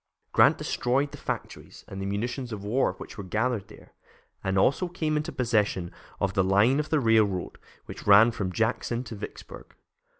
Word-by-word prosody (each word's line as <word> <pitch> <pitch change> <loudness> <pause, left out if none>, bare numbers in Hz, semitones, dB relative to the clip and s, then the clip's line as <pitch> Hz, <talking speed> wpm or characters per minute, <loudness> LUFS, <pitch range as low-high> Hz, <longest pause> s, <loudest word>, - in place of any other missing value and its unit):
Grant - - +5
destroyed 135 +4 0
the - - -10
factories - - -6
and 95 -2 -7
the 95 - -3
munitions 120 +5 -3
of 105 -2 -6
war 110 0 +1
which - - -11
were - - -4
gathered 110 +2 -1
there, 110 - -16 0.5
and 95 0 0
also 140 - +2
came 160 -3 -2
into 155 +3 -2
possession 105 - 0 0.3
of 95 -1 0
the 95 -2 +2
line 100 +9 +3
of 150 0 -3
railroad 110 - +2 0.3
which - - -10
ran 105 +4 +7
from 100 -5 -3
Jackson 115 +3 -1
to 115 -2 -8
Vicksburg. 100 - -10
110 Hz, 170 wpm, -27 LUFS, 100-125 Hz, 0.5 s, ran